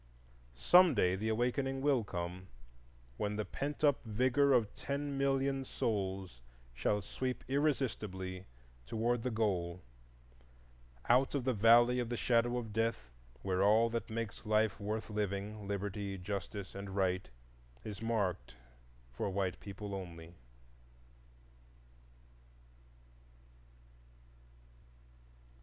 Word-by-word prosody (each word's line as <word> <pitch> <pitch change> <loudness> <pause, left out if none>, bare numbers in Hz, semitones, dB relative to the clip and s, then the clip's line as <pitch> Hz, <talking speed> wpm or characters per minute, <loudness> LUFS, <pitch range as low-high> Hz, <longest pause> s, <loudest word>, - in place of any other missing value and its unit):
Some 175 - +6
day 90 -3 +3
the 110 +3 -2
Awakening 125 +4 0
will 135 -4 +3
come, 90 -1 -5 0.7
when 105 0 -1
the 105 0 -2
pent 145 +2 -4
up 145 -2 +4
vigor 130 +5 +2
of 120 -5 +3
ten 140 0 -3
million 135 0 +1
souls 95 - -3 0.3
shall 105 +11 0
sweep 130 +4 -3
irresistibly 110 -10 -1 0.4
toward 115 - 0
the 125 - -1
Goal, 90 -6 -1 1.2
out 130 +4 +4
of 140 - 0
the 130 0 +1
Valley 120 +3 +6
of 120 -2 -2
the 120 - -2
Shadow 120 +1 +2
of 115 -4 -5
Death, 110 - -1 0.3
where 95 0 0
all 110 +3 +5
that 115 0 -3
makes 115 -2 -4
life 110 0 +2
worth 110 +2 -3
living—Liberty, 100 -1 -3
Justice, 100 +1 -5
and 100 0 -6
Right—is 60 - -4
marked 100 - -1 0.6
"For 60 - -2
White 95 -1 -1
People 100 0 -7
Only." 85 -3 -7
105 Hz, 105 wpm, -34 LUFS, 95-120 Hz, 1.2 s, Some